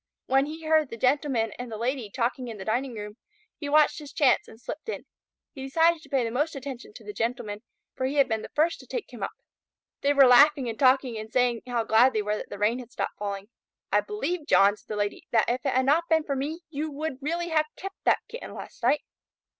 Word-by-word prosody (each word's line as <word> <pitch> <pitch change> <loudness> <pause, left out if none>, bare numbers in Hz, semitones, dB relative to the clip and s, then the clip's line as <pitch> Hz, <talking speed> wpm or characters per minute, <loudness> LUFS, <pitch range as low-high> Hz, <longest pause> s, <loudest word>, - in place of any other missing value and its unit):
When 270 +2 +3
he 315 +1 -7
heard 310 -3 +3
the 230 - -7
Gentleman 255 -3 +1
and 245 -1 -6
the 220 - -4
Lady 240 -1 -2
talking 250 +3 -2
in 225 -2 -6
the 190 - -8
dining 245 +3 -1
room, 210 0 -7 0.4
he 290 - -4
watched 300 +1 +4
his 295 -2 -10
chance 275 -4 +3
and 220 - -14
slipped 310 - -7
in. - - -5 0.5
He 270 - -9
decided 325 +5 +3
to - - -16
pay 270 -3 +1
the 230 - -2
most 295 +6 0
attention 275 - -7
to - - -12
the 415 - -7
Gentleman, 230 - -3 0.3
for 260 - -1
he 275 - -3
had 280 -2 +5
been 220 -2 -1
the - - -8
first 320 +3 +2
to - - -14
take 485 - -5
him - - -9
up. - - -1 0.7
They 285 - +3
were 280 -1 +7
laughing 270 +2 +6
and 225 -1 -5
talking 255 -3 +3
and 215 +1 -8
saying 245 -2 +2
how 240 -2 0
glad 230 +4 +5
they 215 -1 0
were 210 +1 0
that - - -7
the - - -7
rain 215 +5 +1
had 245 -1 -10
stopped - - -4
falling. 200 0 -4 0.4
"I - - +4
believe, 360 -6 -3
John," 200 -6 +6
the 215 - -4
Lady 205 0 -3
said, 235 - +1
"that 225 - +3
if 255 +2 -6
it 270 - +1
had 260 0 +3
not 310 +5 +3
been 320 -1 +3
for 280 -2 -2
me, 300 +6 -3
you 310 +1 -3
would 290 -2 -5
really 340 +4 -2
have 310 -1 +2
kept 390 +1 -8
that - - +4
Kitten 480 - -8
last - - -10
night." 295 - +2
265 Hz, 245 wpm, -27 LUFS, 230-300 Hz, 0.7 s, were